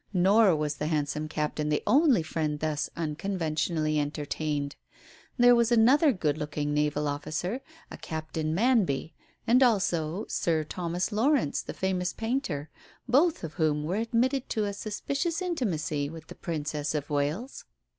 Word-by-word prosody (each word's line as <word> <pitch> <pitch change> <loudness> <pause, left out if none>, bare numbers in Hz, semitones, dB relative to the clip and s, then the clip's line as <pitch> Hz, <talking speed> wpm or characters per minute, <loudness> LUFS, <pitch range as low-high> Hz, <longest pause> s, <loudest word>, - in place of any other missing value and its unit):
Nor 195 +1 +5
was 150 -1 -2
the 150 - -2
handsome 155 0 -1
captain 150 0 -2
the 150 - 0
only 275 - +4
friend 155 -2 -2
thus 155 -1 -1
unconventionally 155 -2 -1
entertained. 145 0 -2 0.6
There 245 0 +7
was 235 0 +2
another 260 +7 +5
good 155 - -1
looking 150 -1 -2
naval 150 0 0
officer, 165 - -3 0.3
a - - -7
Captain 160 0 -3
Manby, 190 - +2 0.3
and 245 +3 +4
also 195 -6 +2
Sir 160 -2 0
Thomas 175 +4 -3
Lawrence, 230 - +2
the - - -8
famous 185 -1 -1
painter, 225 - -3 0.4
both 295 - +3
of 160 -2 -5
whom 150 -3 +1
were 175 +6 -1
admitted 245 +4 0
to 215 -2 0
a 200 - -2
suspicious 275 - -2
intimacy 170 - -1
with 160 0 -10
the - - -7
Princess 150 -2 -3
of 150 0 -3
Wales. 150 - -2
165 Hz, 145 wpm, -28 LUFS, 150-225 Hz, 0.6 s, There